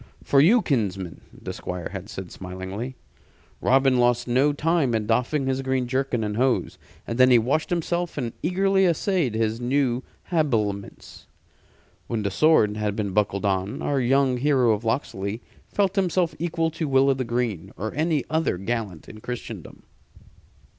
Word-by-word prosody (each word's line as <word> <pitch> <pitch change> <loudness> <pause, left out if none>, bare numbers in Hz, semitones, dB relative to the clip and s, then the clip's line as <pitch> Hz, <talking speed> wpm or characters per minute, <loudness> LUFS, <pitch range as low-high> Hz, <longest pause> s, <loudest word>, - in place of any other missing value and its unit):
"For 140 - +4
you, 215 +9 +5
kinsman," 95 - -2
the - - -8
Squire 90 -1 -5
had 95 +1 -7
said, 95 -3 -7
smilingly. 95 +7 -6 0.7
Robin 130 0 +3
lost 120 0 +2
no 130 +4 +3
time 150 -4 +1
in 110 -1 -1
doffing 125 +6 +1
his 135 0 0
green 130 -1 -1
jerkin 130 -2 -1
and 105 0 -3
hose, 130 0 0 0.3
and 115 +2 -4
then 130 0 +7
he 125 - +7
washed 135 +7 0
himself 175 0 -1
and 120 -5 -3
eagerly 190 +2 +2
essayed 170 - 0
his 110 +1 0
new 125 -1 +1 0.3
habiliments. 110 - -2 0.8
When 110 -3 -2
the 100 - -1
sword 105 -6 +3
had 105 -1 -1
been 105 -2 -2
buckled 100 0 0
on, 95 0 -1
our 140 -1 +1
young 130 +1 +2
hero 130 -3 +3
of 110 +1 -1
Locksley 110 -3 -2 0.2
felt 195 -2 0
himself 180 -3 +1
equal 165 -1 -1
to 160 -1 -3
Will 135 0 +4
o' - - +4
th' 130 -2 -3
Green 110 -7 -2
or 110 +1 -4
any 155 -1 0
other 160 - 0
gallant 100 -4 -4
in 110 - -11
Christendom. 125 +1 -7
125 Hz, 160 wpm, -24 LUFS, 105-150 Hz, 0.8 s, then